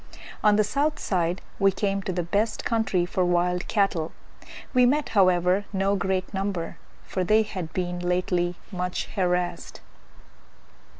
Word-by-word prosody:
On 210 -1 +5
the 215 - +4
south 285 +8 0
side 175 -1 -1 0.2
we 195 -1 +5
came 195 0 -1
to 190 - -3
the 175 -1 -1
best 205 +6 -1
country 220 -6 +1
for 180 +1 0
wild 180 0 +1
cattle; 195 -6 +1 0.6
we 250 -1 +5
met, 285 +4 +2
however, 185 0 +3
no 195 0 +1
great 190 0 -1
number, 190 -3 -3 0.3
for 185 - -2
they 215 +4 +4
had 185 -6 -6
been 180 -1 -2
lately 180 0 0 0.2
much 180 -1 -2
harassed. 180 -3 -1
185 Hz, 140 wpm, -25 LUFS, 180-205 Hz, 0.6 s, On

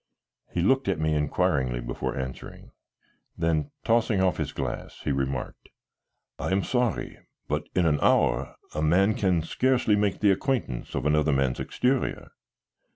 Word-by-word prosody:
He 85 - -1
looked 135 +5 +3
at 95 -4 +1
me 80 0 +1
inquiringly 65 -4 +1
before - - -4
answering, 65 0 -7 0.7
then 80 -3 0
tossing 115 -3 +2
off 95 -2 +2
his - - -2
glass, - - -5
he - - 0
remarked: 65 -1 -3 0.7
"I - - -2
am 95 +1 +2
sorry, 125 -5 -1 0.3
but - - -2
in 90 - +3
an 75 -2 +2
hour - - +2 0.2
a 75 - -2
man 95 +7 +3
can 90 -6 +1
scarcely 125 +4 +2
make 105 -2 0
the 105 -2 +4
acquaintance 100 - -2
of - - -2
another 75 0 +3
man's 70 -2 +1
exterior." 130 +1 -1
85 Hz, 150 wpm, -26 LUFS, 75-105 Hz, 0.7 s, the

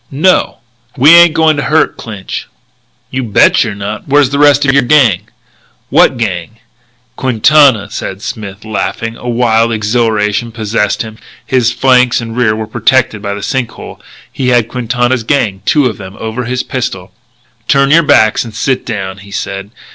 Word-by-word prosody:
"No." 160 +7 +1 0.4
"We 140 +5 +6
ain't 170 -1 +7
going 160 -2 +2
to - - -1
hurt 155 +1 +1
Clinch." 105 -4 -7 0.6
"You 130 - -2
bet 110 -4 +3
you're 110 -4 -4
not. 100 +2 -6
Where's 140 -1 +3
the 140 - -1
rest 145 -1 +4
of 135 - +2
your 140 - +4
gang?" 120 - +2 0.6
"What 130 - +4
gang?" 100 -2 -4 0.6
"Quintana's," 130 -3 +3
said 95 +1 -6
Smith, 105 -1 -7
laughing. 115 +1 -3
A 125 - -7
wild 115 -1 +1
exhilaration 110 0 -1
possessed 110 -2 -1
him. 110 0 -11 0.3
His 125 -4 +1
flanks 125 -1 +2
and 115 -1 -7
rear 120 -3 +1
were 110 0 -4
protected 115 0 0
by 100 -1 -4
the 100 - -7
sink 130 0 -2
hole. - - -11 0.3
He 130 - -3
had 120 -3 +2
Quintana's 125 0 -1
gang 110 -7 -1
two 150 -3 +3
of 110 -6 -2
them 95 +1 -10
over 110 +3 -4
his 125 +1 -2
pistol. 95 -8 -5 0.6
"Turn 140 0 +2
your 165 +2 +6
backs 145 -8 +3
and 115 -3 -10
sit 130 +4 -2
down," 95 -4 -5
he 100 +1 -14
said. 100 0 -5
115 Hz, 170 wpm, -12 LUFS, 105-130 Hz, 0.6 s, ain't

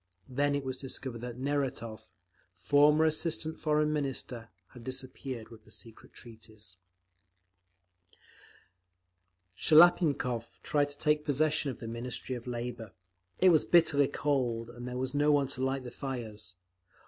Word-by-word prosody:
Then 140 +2 +1
it 140 - -2
was 130 -1 -3
discovered 130 -3 -3
that 120 -1 -6
Neratov, 130 -6 -3 0.5
former 150 - +4
assistant 160 0 0
Foreign 150 0 +1
Minister, 130 -5 -3 0.2
had 120 -2 -13
disappeared 130 -2 -4
with 115 -2 -14
the - - -20
Secret 115 -1 -10
Treaties…. 110 -4 -13 2.8
Shliapnikov 150 - +4
tried 145 -1 +1
to 145 - -8
take 150 0 +2
possession 150 0 +1
of 130 - -5
the 115 - -7
Ministry 120 +3 -4
of 120 0 -8
Labour. 120 -3 -5 0.4
It 185 - +6
was 160 -3 +5
bitterly 160 -5 +4
cold, 120 -5 -1
and 120 +1 -8
there 125 0 -4
was 130 0 -2
no 145 +1 +3
one 145 -1 +3
to 130 -2 -4
light 135 0 -1
the 125 - -8
fires. 110 -8 -5
130 Hz, 135 wpm, -31 LUFS, 120-145 Hz, 2.8 s, It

